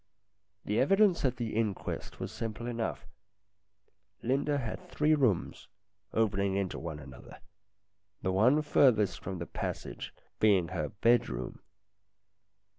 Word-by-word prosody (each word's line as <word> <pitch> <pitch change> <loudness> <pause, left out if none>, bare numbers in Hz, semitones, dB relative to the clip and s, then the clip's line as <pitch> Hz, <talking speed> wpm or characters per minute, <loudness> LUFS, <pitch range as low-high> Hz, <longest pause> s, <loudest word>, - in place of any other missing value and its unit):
The 105 - +1
evidence 195 +5 +4
at 125 -1 +1
the 115 -3 -3
inquest 110 -4 -2
was - - -4
simple 115 +1 -5
enough. 120 -2 -3 1.2
Linda 140 +4 +1
had 140 +8 -5
three 155 -1 +2
rooms, 125 - +1 0.4
opening 100 -3 +1
into 95 -2 -2
one 80 -2 -5
another, 65 -4 -12 0.8
the 95 - +1
one 125 +11 +4
furthest 105 - +3
from 95 0 -5
the 85 - -4
passage - - -5 0.3
being 95 -6 +4
her 75 - -2
bed 115 +4 +3
room. 60 0 -5
110 Hz, 120 wpm, -31 LUFS, 95-130 Hz, 1.2 s, evidence